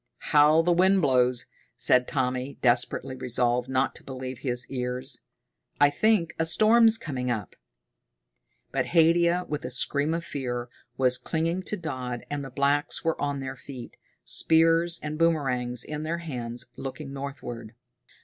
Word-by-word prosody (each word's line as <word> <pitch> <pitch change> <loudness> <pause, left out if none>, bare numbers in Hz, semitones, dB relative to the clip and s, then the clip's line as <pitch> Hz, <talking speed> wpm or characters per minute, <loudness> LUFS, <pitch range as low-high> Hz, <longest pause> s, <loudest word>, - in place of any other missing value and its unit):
"How 150 +2 +6
the 175 - +2
wind 190 +1 +4
blows," 125 -2 +2 0.3
said 125 +1 +3
Tommy, 130 0 -2
desperately 125 +1 +1
resolved 125 0 0
not 130 0 +1
to - - -12
believe 130 -1 -6
his 125 -2 -3
ears. 125 0 -2 0.6
"I 145 0 +6
think 210 0 +2
a 165 - +2
storm's 225 +5 +5
coming 130 - -4
up." 110 -5 -3 1.2
But - - -1
Haidia, 170 +2 +4
with 150 -1 -4
a 125 - -4
scream 145 +5 +1
of 170 0 -4
fear, 125 -3 -4 0.3
was 125 -1 +3
clinging 165 +3 -1
to 210 - -1
Dodd, 130 -7 -5
and 145 -1 -2
the 135 - -7
blacks 140 +3 0
were 165 0 -1
on 145 -1 -1
their 130 0 -5
feet, 125 -1 -10 0.3
spears 165 +1 +2
and 150 +1 -4
boomerangs 125 -7 +1
in 150 0 -5
their 160 +2 -2
hands, 125 -7 -5
looking 135 +1 -7
northward. 120 -5 -7
140 Hz, 150 wpm, -26 LUFS, 125-165 Hz, 1.2 s, How